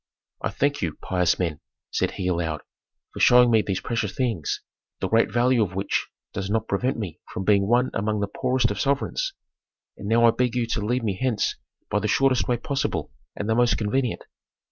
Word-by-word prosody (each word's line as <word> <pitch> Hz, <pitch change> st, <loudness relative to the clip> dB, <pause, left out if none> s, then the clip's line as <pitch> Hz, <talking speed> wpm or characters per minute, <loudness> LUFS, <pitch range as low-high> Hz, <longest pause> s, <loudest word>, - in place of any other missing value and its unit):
"I -, -, -1 dB
thank 145 Hz, +1 st, 0 dB
you, 80 Hz, -3 st, -2 dB
pious 90 Hz, -3 st, +1 dB
men," 80 Hz, -4 st, -2 dB, 0.3 s
said -, -, +1 dB
he 95 Hz, -, -4 dB
aloud, 85 Hz, -3 st, -1 dB, 0.5 s
"for -, -, -7 dB
showing 125 Hz, -1 st, +6 dB
me 110 Hz, -1 st, +5 dB
these 95 Hz, -3 st, -2 dB
precious 115 Hz, -1 st, -2 dB
things, 115 Hz, -, -1 dB, 0.4 s
the -, -, -1 dB
great 115 Hz, 0 st, +3 dB
value 120 Hz, 0 st, +3 dB
of 95 Hz, -3 st, -1 dB
which 95 Hz, +1 st, -1 dB, 0.3 s
does 95 Hz, 0 st, -3 dB
not 110 Hz, +1 st, 0 dB
prevent 125 Hz, +7 st, 0 dB
me 90 Hz, -6 st, -5 dB
from 95 Hz, -, -4 dB
being 100 Hz, 0 st, +3 dB
one 125 Hz, +3 st, +3 dB
among 105 Hz, +1 st, 0 dB
the 100 Hz, -, +1 dB
poorest 125 Hz, +2 st, 0 dB
of 100 Hz, -, -4 dB
sovereigns. 140 Hz, -, 0 dB, 0.6 s
And 100 Hz, -, -7 dB
now 115 Hz, +2 st, +4 dB
I 115 Hz, -, +7 dB
beg 125 Hz, 0 st, 0 dB
you 120 Hz, -1 st, +1 dB
to 115 Hz, -1 st, -2 dB
lead 120 Hz, +3 st, 0 dB
me 100 Hz, -4 st, -2 dB
hence 125 Hz, -5 st, +1 dB, 0.4 s
by 105 Hz, -, +2 dB
the 105 Hz, -, -1 dB
shortest 130 Hz, +3 st, +2 dB
way 125 Hz, -, +1 dB
possible 140 Hz, +3 st, -2 dB, 0.2 s
and 105 Hz, -, -4 dB
the 110 Hz, -, +2 dB
most 120 Hz, +1 st, +3 dB
convenient." 120 Hz, +3 st, -1 dB
115 Hz, 200 wpm, -25 LUFS, 100-125 Hz, 0.6 s, I